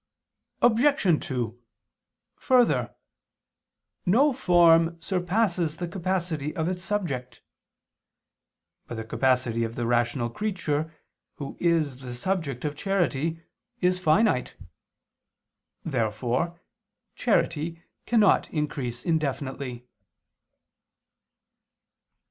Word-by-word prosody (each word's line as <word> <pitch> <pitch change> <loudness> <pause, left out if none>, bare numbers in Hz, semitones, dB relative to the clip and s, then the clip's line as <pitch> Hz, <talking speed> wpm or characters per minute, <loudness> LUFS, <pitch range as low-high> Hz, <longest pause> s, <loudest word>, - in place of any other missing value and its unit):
Obj. 240 - +4
2: 120 -3 -3 0.8
Further, 250 -3 +2 1.1
no 265 +10 +4
form 170 -6 +4
surpasses 180 -2 0
the 175 - -3
capacity 170 -4 -2
of 160 -2 -1
its 180 0 -3
subject. 135 - -3 1.4
But 120 - -6
the 110 - -4
capacity 120 -1 +1
of 115 0 -4
the 120 - -2
rational 120 0 +1
creature 160 - -2 0.4
who 140 - -7
is 160 -6 +1
the 125 -2 -7
subject 150 -3 -2
of 150 0 -2
charity 165 -3 -1 0.4
is 180 0 +2
finite. 180 - +2 1.3
Therefore 125 +5 -1 0.5
charity 165 -6 0 0.2
cannot 220 -4 +4
increase 140 -6 -3
indefinitely. 140 -6 -2
160 Hz, 85 wpm, -26 LUFS, 130-180 Hz, 1.4 s, Obj